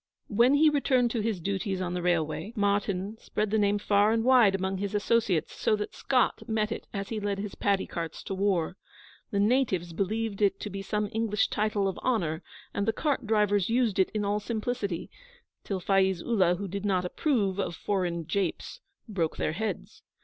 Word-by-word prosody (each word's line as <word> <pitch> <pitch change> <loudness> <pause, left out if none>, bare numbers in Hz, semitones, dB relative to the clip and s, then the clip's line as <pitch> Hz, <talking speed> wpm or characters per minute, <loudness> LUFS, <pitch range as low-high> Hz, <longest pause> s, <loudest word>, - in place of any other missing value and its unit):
When 235 +6 +4
he 305 +1 +5
returned 255 -4 +2
to 230 - -1
his 215 -3 -1
duties 195 +1 -2
on 180 -1 -2
the 180 - -2
railway, 175 +4 0
Martyn 205 0 0
spread 210 -1 -2
the 220 - +2
name 205 0 +3
far 205 +1 +3
and 225 0 +1
wide 240 -6 +5
among 190 0 -2
his 200 +1 -3
associates, 205 -6 +1
so 215 - +1
that 210 0 -4
Scott 255 -2 +1
met 220 0 0
it - - -5
as 200 -1 -4
he 225 - -2
led 205 -1 -2
his 200 0 -5
paddy 200 -1 +1
carts 165 -2 -5
to - - -4
war. 190 -3 0 0.5
The 200 - -1
natives 205 -6 +1
believed 210 +3 -2
it 195 -1 +2
to 210 - -5
be 195 +1 -5
some 210 +2 -1
English 220 -2 +1
title 210 -2 0
of 190 - -3
honour, 170 -11 0 0.3
and 200 +1 -1
the 225 - +2
cart 270 -3 -1
drivers 205 -3 +2
used 230 -4 +1
it 190 - +4
in 210 -1 -2
all 205 +1 +1
simplicity 215 -5 -3 0.5
till 195 -2 -3
Faiz 190 -1 +2
Ullah, 190 -7 +3
who 200 +2 -5
did 200 +2 -5
not 185 -3 +1
approve 200 - 0
of 175 - -2
foreign 175 -4 -1
japes, 190 0 -2 0.3
broke 175 -7 -2
their 155 - -1
heads. 220 +6 -4
200 Hz, 195 wpm, -28 LUFS, 190-220 Hz, 0.5 s, he